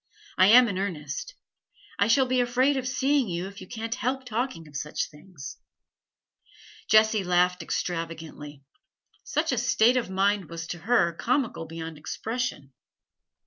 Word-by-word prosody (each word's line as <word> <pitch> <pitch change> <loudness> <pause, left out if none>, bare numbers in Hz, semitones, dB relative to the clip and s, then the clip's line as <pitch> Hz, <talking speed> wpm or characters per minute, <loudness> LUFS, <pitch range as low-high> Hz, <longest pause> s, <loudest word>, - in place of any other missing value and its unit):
I 185 - +6
am 245 +3 +8
in 195 -3 -2
earnest; 180 - -4 0.6
I 200 - +4
shall 260 +4 +4
be 255 0 +2
afraid 255 +3 +2
of 260 -1 -2
seeing 270 0 +1
you 175 0 -3
if 195 0 -9
you 185 - -10
can't 225 +1 -4
help 255 +2 -2
talking 235 -8 -3
of 150 - -16
such 150 +2 -3
things.' 150 -1 -10 1.3
Jessie 215 -1 +5
laughed 180 0 +2
extravagantly; 160 -4 -5 0.6
such 305 +1 0
a 250 - +1
state 240 +1 +3
of 240 - -1
mind 195 +1 +1
was 165 -1 -6
to 175 - -5
her 190 -3 +2
comical 235 - -1
beyond 165 -1 -7
expression. 215 - -4
200 Hz, 145 wpm, -27 LUFS, 165-250 Hz, 1.3 s, am